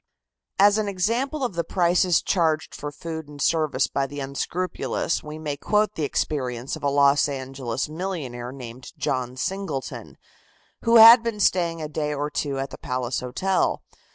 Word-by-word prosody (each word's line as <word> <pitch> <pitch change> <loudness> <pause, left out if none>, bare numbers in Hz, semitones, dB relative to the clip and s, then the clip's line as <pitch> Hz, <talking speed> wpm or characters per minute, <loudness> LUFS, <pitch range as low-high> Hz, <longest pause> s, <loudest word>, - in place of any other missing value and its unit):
As 205 +2 +5
an 215 - -1
example 235 +10 -1
of 245 - -1
the 170 0 -1
prices 175 0 +2
charged 160 -4 0
for 145 - -6
food 160 0 -7
and 145 -1 -12
service 155 -1 +1
by 135 -1 -1
the 145 +1 -8
unscrupulous, 165 +6 -2
we 150 +1 -7
may 150 -2 -4
quote 210 +6 +1
the 160 - -5
experience 130 -4 -2
of - - -10
a 145 - +1
Los 140 +1 +4
Angeles 130 -3 -4
millionaire 150 -8 -5
named 125 -1 -10
John 125 -1 -2
Singleton, 190 -3 -4 0.7
who 230 0 +3
had 230 +1 +10
been 230 -2 -3
staying 170 -4 +1
a - - -3
day 150 0 -2
or 145 +1 -3
two 140 -2 -2
at 135 0 -4
the - - -9
Palace 125 -1 -2
Hotel. 185 +10 0
150 Hz, 165 wpm, -24 LUFS, 135-185 Hz, 0.7 s, had